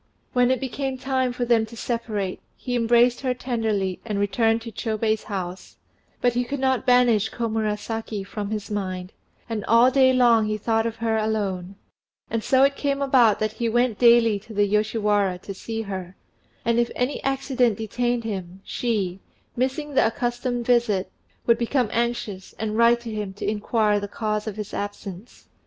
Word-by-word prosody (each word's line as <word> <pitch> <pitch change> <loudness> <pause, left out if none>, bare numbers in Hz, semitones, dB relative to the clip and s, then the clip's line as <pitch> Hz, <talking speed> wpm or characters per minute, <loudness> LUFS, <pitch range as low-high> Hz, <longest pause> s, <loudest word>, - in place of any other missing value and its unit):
When 250 -1 +4
it 260 -1 +2
became 265 +1 -3
time 260 -1 0
for 245 0 -2
them 235 -2 +3
to 230 +1 -12
separate, 215 -5 -3 0.2
he 245 - -3
embraced 240 +1 +3
her 255 -2 0
tenderly 220 -7 -1
and 210 -3 -3
returned 225 +3 +1
to 230 - -7
Chôbei's 220 0 -1
house; 185 -2 -6 0.4
but 245 -1 +3
he 245 +1 +1
could 280 +3 -4
not 260 -1 +1
banish 240 -4 +4
Komurasaki 220 -1 -3
from 205 0 -5
his 210 -1 -4
mind, 185 -2 -4 0.3
and 225 -3 -3
all 235 +3 +5
day 260 -1 +5
long 240 -4 +4
he 215 0 -1
thought 225 +1 +1
of 230 - -4
her 225 -1 0
alone; 200 -4 -2 0.6
and 230 -1 -1
so 265 0 +4
it 275 0 +3
came 280 -1 -1
about 255 -6 +4
that 215 0 -1
he 230 +1 -2
went 240 -1 +1
daily 235 -3 +5
to 215 +2 -12
the 205 0 +4
Yoshiwara 210 -2 +1
to 200 - -6
see 225 +3 -5
her, 190 -3 -6 0.5
and 235 +1 +2
if 235 - +2
any 250 +3 -1
accident 265 -4 +1
detained 240 +2 -1
him, 190 -4 -5
she, 200 -6 -2 0.4
missing 265 +4 -2
the 265 - +4
accustomed 240 +1 -2
visit, 230 -6 +2 0.3
would 235 0 +4
become 240 -1 +1
anxious 235 -5 -2
and 215 -1 -3
write 235 +1 +4
to 235 -1 -6
him 210 -2 -4
to 200 - -5
inquire 210 0 +1
the 205 - -5
cause 215 0 -2
of 210 - -4
his 210 -2 -6
absence. 205 0 -7
225 Hz, 175 wpm, -24 LUFS, 210-245 Hz, 0.6 s, all